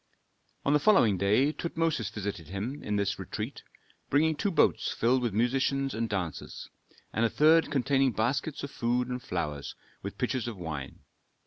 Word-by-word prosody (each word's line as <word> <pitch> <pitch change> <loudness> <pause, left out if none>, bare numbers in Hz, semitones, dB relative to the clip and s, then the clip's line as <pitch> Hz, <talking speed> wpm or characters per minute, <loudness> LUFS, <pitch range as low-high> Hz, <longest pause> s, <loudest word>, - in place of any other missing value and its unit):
On 140 - +3
the 150 - +5
following 145 - +5
day 105 +10 +3
Tutmosis 165 -10 -1
visited 100 -6 -5
him 105 - -4
in 105 - -2
this 100 -1 0
retreat, - - -5 0.5
bringing 155 +3 +3
two 200 - 0
boats 160 -6 +2
filled 125 +3 +2
with 120 -2 0
musicians 135 +5 +1
and 115 0 -2
dancers, 90 -6 -4 0.4
and 115 - +1
a 115 - +3
third 160 +4 +4
containing 135 -1 +2
baskets 130 +7 -1
of 140 - -5
food 120 +1 0
and 125 0 -3
flowers, 75 - -4 0.3
with - - -6
pitchers 125 -3 -1
of 115 -4 -5
wine. 75 -6 -6
120 Hz, 160 wpm, -29 LUFS, 100-140 Hz, 0.5 s, the